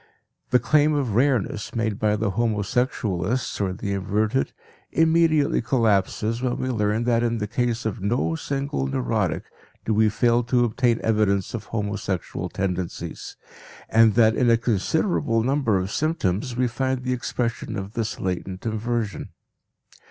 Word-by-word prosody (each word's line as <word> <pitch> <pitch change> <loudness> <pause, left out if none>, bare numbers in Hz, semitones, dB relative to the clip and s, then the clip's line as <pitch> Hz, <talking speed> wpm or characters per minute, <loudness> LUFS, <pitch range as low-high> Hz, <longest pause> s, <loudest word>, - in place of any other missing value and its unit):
The 125 - +5
claim 150 +5 +3
of 135 -7 -1
rareness 120 -4 0
made 110 -3 -1
by 105 -1 +2
the 105 -1 -1
homosexualists 110 0 -1
or 95 -2 0
the 100 +2 -3
inverted 105 +6 0 0.4
immediately 160 -2 +3
collapses 115 -1 +1
when 125 -1 -1
we 130 - -2
learn 110 -1 0
that 120 -1 +2
in 115 -1 0
the 105 - -2
case 120 +1 -1
of 110 -1 -3
no 120 +10 0
single 140 - -2
neurotic 65 -2 -1 0.4
do 110 - +1
we 110 0 +4
fail 120 +3 +2
to 120 0 +3
obtain 120 0 +1
evidence 105 -3 +1
of 110 -3 -5
homosexual 100 -4 -3
tendencies, 90 -2 -4 0.5
and 110 -2 +5
that 110 -1 +5
in 120 - +3
a 115 - +5
considerable 115 - +1
number 130 -5 +1
of 95 +1 -2
symptoms 125 - -1
we 125 0 +2
find 130 +2 -2
the 125 0 0
expression 115 -2 -3
of 100 +2 -6
this 115 -2 -3
latent 95 +1 -4
inversion. 110 -1 -2
115 Hz, 145 wpm, -24 LUFS, 105-125 Hz, 0.5 s, The